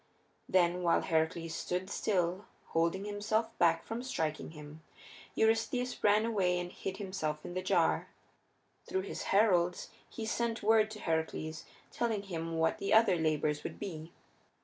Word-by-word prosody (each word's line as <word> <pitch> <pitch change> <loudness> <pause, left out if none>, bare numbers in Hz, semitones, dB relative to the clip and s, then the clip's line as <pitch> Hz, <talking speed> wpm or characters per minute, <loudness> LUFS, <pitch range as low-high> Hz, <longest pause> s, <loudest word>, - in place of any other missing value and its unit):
Then 180 -1 +3
while 170 -1 +3
Heracles 165 0 0
stood 180 +1 -2
still, 185 -1 0 0.2
holding 170 +4 +1
himself 215 +2 -1
back 165 -1 +3
from 225 +1 -4
striking 160 - -2
him, 150 0 -11 0.5
Eurystheus 225 +3 +1
ran 210 +1 +4
away 185 -6 +1
and 175 0 -5
hid 190 0 -5
himself 185 -7 -3
in - - -6
the 185 - -2
jar. 185 - +2 0.8
Through 190 - -1
his 195 - -5
heralds 180 -4 +3 0.2
he 225 - -6
sent 230 0 -1
word 220 0 +4
to 215 -1 -8
Heracles, 160 -1 -2 0.3
telling 225 -4 -1
him 165 -4 -4
what 160 0 +1
the 200 - -2
other 220 -4 +6
labors 155 -2 0
would - - -5
be. 165 -3 -6
185 Hz, 150 wpm, -32 LUFS, 165-215 Hz, 0.8 s, other